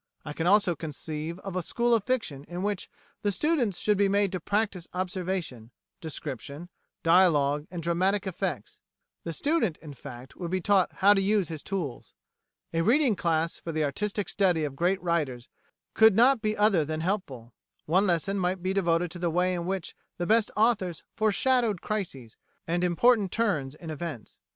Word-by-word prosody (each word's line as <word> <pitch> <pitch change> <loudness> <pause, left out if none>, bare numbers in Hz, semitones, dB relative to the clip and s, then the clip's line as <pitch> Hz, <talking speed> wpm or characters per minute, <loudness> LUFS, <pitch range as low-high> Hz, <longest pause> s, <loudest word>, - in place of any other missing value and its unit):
I 150 - -5
can 165 +3 -2
also 200 -2 +4
conceive 155 +1 -5
of 195 -2 -6
a 185 - 0
School 235 +7 0
of 225 -3 +3
Fiction 225 - -2
in 175 +3 -5
which 205 -2 -2 0.3
the 205 - +1
students 245 - 0
should 210 -2 +1
be 200 -1 +4
made 200 -1 +2
to 185 - -2
practise 200 -1 -1
observation, 180 - -3 0.3
description, 150 +1 -6 0.3
dialogue, 155 -4 +4
and 170 -2 -6
dramatic 185 +4 +1
effects. 190 -3 -4 0.4
The 170 - -3
student, 230 - 0
in 150 -3 -10
fact, 125 0 -11
would 175 -2 -5
be 185 +1 0
taught 190 0 +2
how 200 +2 +5
to 195 - +2
use 200 -3 +1
his 160 -3 -5
tools." 170 -11 -5 0.6
A 165 - +1
reading 245 - +3
class 165 -2 0
for 165 - -5
the 155 -1 0
artistic 200 +8 -2
study 180 -6 +2
of 145 -2 -3
great 180 +6 +1
writers 150 -9 -1 0.5
could 220 -2 +6
not 245 +2 +5
be 215 0 -1
other 205 -6 +4
than 155 +1 -3
helpful. 140 - -3 0.3
One 190 +6 +3
lesson 190 +3 +1
might 180 0 -1
be 190 +1 0
devoted 175 -3 +1
to 175 - -7
the 175 -1 0
way 180 +2 +1
in 175 -1 -3
which 190 -2 -3 0.2
the 175 - -2
best 220 +2 +3
authors 210 -6 +1
foreshadowed 220 -1 +2
crises 165 - -5 0.3
and 175 +2 -1
important 200 +3 +3
turns 155 -12 0
in 160 0 -8
events. 155 -7 -7
180 Hz, 175 wpm, -27 LUFS, 160-205 Hz, 0.6 s, could